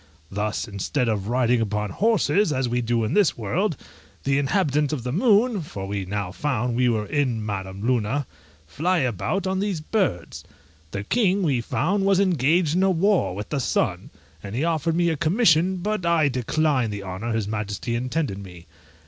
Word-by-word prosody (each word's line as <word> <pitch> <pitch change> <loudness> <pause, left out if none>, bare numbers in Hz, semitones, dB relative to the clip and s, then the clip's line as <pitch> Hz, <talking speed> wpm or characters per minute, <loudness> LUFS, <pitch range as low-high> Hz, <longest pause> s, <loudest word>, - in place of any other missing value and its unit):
Thus, 105 +3 -2
instead 110 +6 -2
of 105 -3 -1
riding 120 0 +2
upon 105 -2 -2
horses, 205 -4 +2
as 130 -2 0
we 120 +1 0
do 115 -1 0
in 110 - -1
this 205 -5 +3
world, 155 - -1 0.5
the 140 0 +2
inhabitants 145 -1 +1
of 130 -6 -3
the 125 - -3
moon 215 - +3
(for 100 -11 -6
we 100 -1 -3
now 100 -1 -3
found 125 0 -1
we 125 0 +3
were 110 -2 0
in 125 -5 -1
Madam 95 0 -5
Luna) 125 +3 0 0.4
fly 165 - 0
about 130 - -1
on 190 0 0
these 200 -4 -1
birds. 155 - -2 0.5
The 100 +4 -4
king, 200 - +1
we 135 -8 +1
found, 190 - 0
was 195 -1 +3
engaged 165 -3 +2
in 180 - +2
a 190 - +4
war 185 - +2
with 105 +1 -6
the 145 - -1
sun, 125 - -1 0.3
and 100 +1 -7
he 135 - 0
offered 165 0 0
me 170 0 +2
a 160 - 0
commission, 175 - +3
but 210 +2 -2
I 170 -4 +3
declined 130 -1 0
the 100 -1 -5
honour 95 +5 -4
his 110 -2 -1
majesty 105 +2 -3
intended 125 -3 -2
me. 90 -4 -11
130 Hz, 180 wpm, -24 LUFS, 105-175 Hz, 0.5 s, a